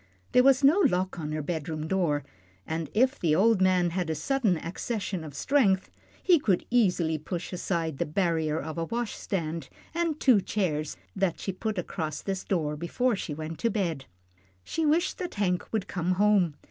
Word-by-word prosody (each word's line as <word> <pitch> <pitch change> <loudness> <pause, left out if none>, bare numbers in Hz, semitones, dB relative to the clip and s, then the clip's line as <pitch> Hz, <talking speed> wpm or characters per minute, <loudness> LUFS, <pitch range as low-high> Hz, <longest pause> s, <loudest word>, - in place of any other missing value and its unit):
There 250 - +6
was 270 +1 +5
no 300 +8 +6
lock 185 - +1
on 150 -1 -4
her 155 -1 -2
bedroom 155 -1 -3
door, 160 -6 +1 0.4
and 160 -1 -3
if 260 +5 +3
the 155 -3 +2
old 215 +2 +4
man 180 -2 +3
had 180 -1 -2
a 160 - 0
sudden 210 - +1
accession 190 +2 -4
of 150 -3 -9
strength, 195 - +2 0.3
he 350 -4 +5
could 195 -10 +1
easily 180 -9 +2
push 175 +4 -5
aside 165 -5 -2
the - - +1
barrier 160 -2 0
of 160 +2 -5
a 165 - -1
wash 235 +3 -3
stand 165 -4 -3 0.2
and 335 -2 -1
two 240 -7 +5
chairs 155 -8 -2 0.2
that 190 -4 0
she 195 - -3
put 210 +3 -3
across 160 -4 -3
this 195 -1 -3
door 155 -6 -1
before 215 +10 0
she 160 -6 -4
went 160 +1 -6
to 230 - +1
bed. 170 -10 -2 0.6
She 320 - -1
wished 330 +4 +1
that 360 -2 -4
Hank 180 -3 -1
would 215 -4 -1
come 180 0 -1
home. 195 -5 +3
185 Hz, 185 wpm, -28 LUFS, 160-220 Hz, 0.6 s, There